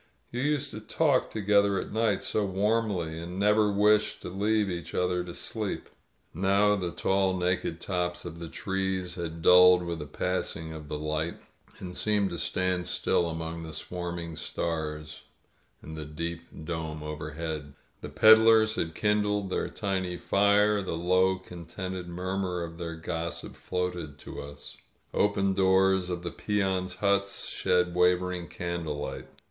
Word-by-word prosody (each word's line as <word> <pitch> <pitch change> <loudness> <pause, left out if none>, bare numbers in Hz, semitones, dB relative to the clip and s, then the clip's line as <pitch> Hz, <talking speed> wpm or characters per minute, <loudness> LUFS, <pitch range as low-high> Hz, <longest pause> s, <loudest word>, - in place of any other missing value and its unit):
You 120 - -2
used 145 -1 0
to 110 - -6
talk 135 +5 +1
together 100 -2 +2
at - - -6
night 110 -3 +1
so 105 - 0
warmly, 100 -4 0
and 85 +2 -6
never 105 +1 +4
wished 105 +1 +3
to - - -5
leave 105 +3 +1
each 85 -2 -5
other 90 0 +1
to 90 -1 -8
sleep... - - -4 0.3
." - - -42
Now 100 +3 +3
the 90 -3 -2
tall, 95 +1 +1
naked 90 -2 -1
tops 90 -2 -2
of 85 - -7
the 85 - -6
trees 95 -1 -2
had 85 -2 -5
dulled 90 0 +8
with 85 -1 -4
the 75 - -6
passing 80 0 -3
of 75 -2 -8
the 75 - -3
light, 75 +2 -2 0.4
and 90 -1 -7
seemed 105 -2 +1
to 85 - -4
stand 90 0 0
still 85 - +1
£mong 80 0 -5
the 80 -1 -7
swarming 85 -1 -5
stars 75 -1 -4 0.6
in 80 - -8
the 80 -1 -6
deep 85 +3 -5 0.2
dome 80 -2 -4
overhead. 75 -1 -5 0.3
f - - -5
riW - - -18
peddlers 110 0 +7
had 80 -1 -2
kindled 105 -2 +1
their - - -1
tiny 95 -3 -2
fire; 100 +2 +3
the 90 -3 -3
low, 90 +2 +3
con 90 -2 -10
tented 95 0 -5
murmur 90 0 -2
of 85 0 -8
their 85 -1 -4
gossip 80 -1 -4
floated 90 -5 -3
to - - -8
us. 70 0 -9 0.4
Open 100 -1 +2
doors 95 -1 +3
of 90 -1 -3
the 85 - -3
peons' 95 -3 -1
huts 100 -1 +1
shed 90 -1 +1
wavering 90 0 +2
candlelight. 85 -4 -4
90 Hz, 155 wpm, -28 LUFS, 85-100 Hz, 0.6 s, dulled